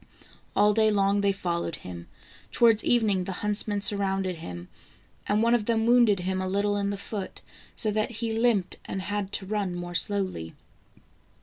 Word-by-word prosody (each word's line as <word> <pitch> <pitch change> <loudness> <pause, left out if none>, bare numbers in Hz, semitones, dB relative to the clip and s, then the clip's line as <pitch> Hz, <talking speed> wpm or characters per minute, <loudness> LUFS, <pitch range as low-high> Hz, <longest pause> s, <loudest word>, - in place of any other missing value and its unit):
All 210 +1 +4
day 220 0 +4
long 200 -1 +2
they 200 0 +3
fol 175 -3 -2
lowed 165 - -4
him. 85 -2 -9 0.4
Towards 230 -2 +4
evening 210 -6 +2
the 190 - -4
huntsmen 205 0 +1
surrounded 195 -3 0
him, 90 - -8 0.6
and 210 +2 +2
one 235 +1 +3
of 235 -3 +2
them 225 -1 +1
wounded 235 -5 +4
him 185 +1 -2
a 185 - -2
little 205 +1 +1
in 200 0 -1
the 200 - -3
foot, 200 0 -6 0.3
so 215 - +1
that 215 +1 0
he 230 -1 -3
limped 225 -5 +1
and 190 - -4
had 205 0 -3
to 195 - -2
run 195 -3 -2
more 175 0 -6
slowly. 185 - -2
200 Hz, 180 wpm, -27 LUFS, 185-215 Hz, 0.6 s, All